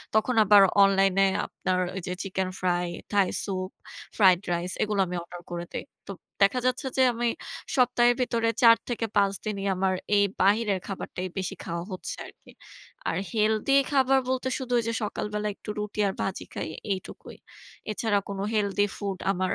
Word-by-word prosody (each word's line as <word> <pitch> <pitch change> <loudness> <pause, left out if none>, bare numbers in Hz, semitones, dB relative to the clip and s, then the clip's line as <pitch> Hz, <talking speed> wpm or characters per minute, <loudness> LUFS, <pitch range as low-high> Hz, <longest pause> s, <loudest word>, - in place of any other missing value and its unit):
তখন 230 +3 +2
আবার 205 -1 +7 0.2
অনলাইন 195 -1 +4
এ - - +6 0.2
আপনার 185 0 -2 0.2
ওই 190 - -3
যে 180 - -2
chicken 190 -1 -2
fry, 180 -1 0 0.2
Thai 200 -2 +3 0.2
soup, 185 -2 -3 0.5
fried 185 -4 +6
rice 175 +1 -1
এগুলো 210 -2 -1
আমি 180 - -4
অর্ডার 175 +1 -10
করে 175 0 -4
দেই। - - -3 0.2
তো - - -5 0.3
দেখা 200 +6 +4
যাচ্ছে 255 +2 0
যে, - - +4
আমি 235 +1 -1 0.5
সপ্তাহের 245 -2 +4
ভিতরে 230 -2 +1
৪ 230 -1 +8
থেকে 230 -1 -1
৫ 200 -1 +3
দিনই 200 -2 -3
আমার 185 0 +1 0.2
এই 200 - +5 0.2
বাহিরের 200 0 +3
খাবারটাই 185 -1 -5
বেশি 190 - -3
খাওয়া 170 0 -4
হচ্ছে 185 - -5
আরকি। - - -17 0.6
আর - - -1
হেলথি 220 +4 +1 0.2
খাবার 270 -1 +4
বলতে 260 0 0
শুধু 250 -2 -2
যে 230 - -1
সকালবেলা 210 0 -3
একটু - - -12
রুটি 210 0 -5
আর 195 - -1
ভাজি 190 - -3
খাই - - -4 0.3
এইটুকুই। 185 - -9 0.5
এছাড়া 210 -1 +1
কোন 200 -1 -5
হেলথি 205 -1 +2
ফুড 200 -2 -3
আমার 185 -1 -1
200 Hz, 170 wpm, -27 LUFS, 185-230 Hz, 0.6 s, ৪